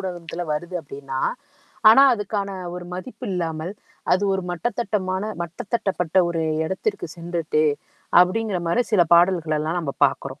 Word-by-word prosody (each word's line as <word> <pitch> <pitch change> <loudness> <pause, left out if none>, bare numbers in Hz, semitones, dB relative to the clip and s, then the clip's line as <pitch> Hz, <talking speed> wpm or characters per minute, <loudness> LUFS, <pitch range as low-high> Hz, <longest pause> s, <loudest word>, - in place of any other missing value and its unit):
ஊடகத்தில 175 -2 -5
வருது 175 +4 -4
அப்படின்னா 135 -2 -6 0.7
ஆனா, 270 +5 +8
அதுக்கான 205 -2 -3 0.3
ஒரு 180 - -7
மதிப்பு 250 +8 -8
இல்லாமல், 165 -1 -3 0.4
அது 185 +3 +3
ஒரு 190 0 -1
மட்டத்தட்டமான 195 0 -2 0.2
மட்டதட்டப்பட்ட 180 0 -3
ஒரு 170 -1 -2 0.2
எடத்திற்கு 190 - -2
சென்றுட்டு 170 -2 -1 0.6
அப்படிங்கிற 195 +2 +1
மாரி 200 +9 +2
சில 190 -5 +6
பாடல்கள 170 -2 +4
எல்லாம் 160 +3 -1
நம்ம 155 -5 -3
பாக்குறோம். - - -1
180 Hz, 125 wpm, -23 LUFS, 165-195 Hz, 0.7 s, ஆனா